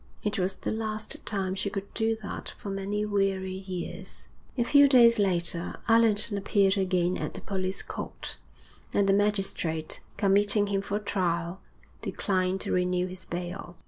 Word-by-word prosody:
It 210 -1 -1
was 185 +1 0
the - - -4
last 215 -1 -4
time 195 -3 0
she 195 +1 -1
could 200 0 -6
do 225 0 +1
that 200 - -6
for 200 - -6
many 200 +2 -2
weary 195 -2 0
years. 185 -2 -6 0.3
A 240 - +3
few 285 +3 +6
days 235 -3 +6
later 175 -3 +1
Allerton 225 -2 +4
appeared 195 0 +3
again 185 -2 +1
at - - -4
the - - -6
police 190 -1 -3
court, - - -6 0.5
and 200 -1 +2
the 195 - +5
magistrate, 195 -6 0 0.2
committing 205 +1 +4
him 195 - +2
for 200 +1 -2
trial, 180 -3 -1 0.4
declined 185 -1 -1
to - - -2
renew 180 0 +1
his 185 0 -3
bail. 175 0 -6
195 Hz, 155 wpm, -28 LUFS, 185-205 Hz, 0.5 s, few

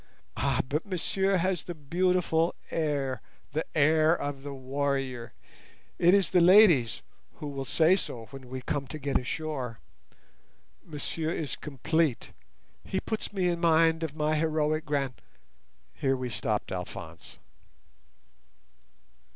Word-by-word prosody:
"Ah! 135 -2 +1
but 150 +4 -1
Monsieur 190 +1 0
has 180 -1 0
the 175 - -7
beautiful 170 +2 +1 0.2
air—the 145 0 -3
air 155 +2 +4
of 145 -1 -4
the 140 +1 -6
warrior. 135 -3 -2 0.7
It 175 +3 +6
is 195 -3 +2
the 180 - +5
ladies 175 - +6 0.3
who - - -8
will 140 -2 -4
say 165 +6 +4
so 120 - -5
when 135 -2 -10
we 130 0 -6
come 140 +2 -2
to 155 - -6
get 140 -1 0
ashore. 130 -4 -4 1.0
Monsieur 155 +1 -3
is 160 -3 -2
complete; 150 0 -1 0.5
he 190 - -2
puts 220 +2 -3
me 190 -3 0
in 170 -1 0
mind 165 -1 +4
of 160 -2 -3
my 155 0 +1
heroic 155 0 +1
grand—" 140 -4 -2 0.7
Here 135 -1 0
we 125 -1 -3
stopped 105 -1 -2
Alphonse. 90 -1 -7
150 Hz, 125 wpm, -28 LUFS, 135-165 Hz, 1.0 s, It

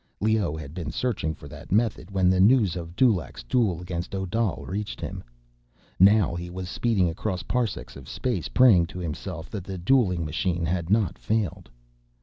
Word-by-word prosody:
Leoh 105 -7 +1
had 75 -2 -8
been 85 -3 -4
searching 95 -8 -2
for - - -12
that - - -11
method 105 -3 +1
when 95 -2 +2
the 90 0 +3
news 105 -3 +5
of 85 -1 -7
Dulaq's 95 - +1
duel 95 - +1
against 90 +1 -4
Odal 95 +3 -1
reached 105 +2 -4
him. - - -5 0.8
Now 100 -1 +5
he 85 +1 -5
was 90 0 -6
speeding 105 -6 +1
across 90 +2 -3
parsecs 125 -5 -2
of 70 - -11
space, 120 -10 -2
praying 105 -10 +5
to 90 - -10
himself 85 0 -5
that 105 -5 -4
the 95 0 -6
dueling 90 -4 +2
machine 85 +2 -1
had 85 0 -1
not 105 -2 +1
failed. 110 -6 -2
95 Hz, 170 wpm, -26 LUFS, 85-110 Hz, 0.8 s, news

